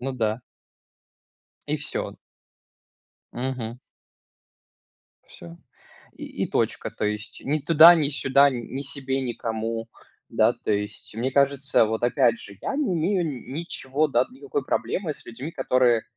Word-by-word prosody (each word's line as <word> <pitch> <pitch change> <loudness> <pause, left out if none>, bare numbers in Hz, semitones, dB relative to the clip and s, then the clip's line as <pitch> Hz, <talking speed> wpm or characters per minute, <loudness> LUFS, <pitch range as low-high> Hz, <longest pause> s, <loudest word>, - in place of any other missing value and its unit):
Ну 135 +2 -3
да. 110 -2 -1 1.3
И - - 0
всё. - - -4 1.2
Мгм. 125 -2 -4 1.5
Всё, 85 0 -12 0.6
и - - -7 0.2
и - - -3
точка. - - -1
То - - -4
есть 105 +1 -4
ни 150 +3 +1
туда, 165 +3 +8
ни 155 -4 +2
сюда, 140 0 +4
н 135 - -2 0.2
ни 135 - -2
себе, 135 -1 -3
никому. 115 -2 -3 0.4
Да, - - +3
то 110 - -2
есть. 105 +1 -4
Мне 120 +4 -1
кажется, 140 -2 +3
вот 110 +1 -2
опять 120 -1 +3
же, 100 -1 -11
я - - -3
не 280 -11 0
имею 175 +2 +1 0.3
ничего, 155 -2 -1
да, 125 -2 +3
никакой 140 +1 -4
проблемы 160 +3 -1
с - - -19
людьми, 130 +7 -7
которые, 125 -6 +3
130 Hz, 135 wpm, -25 LUFS, 115-145 Hz, 1.5 s, туда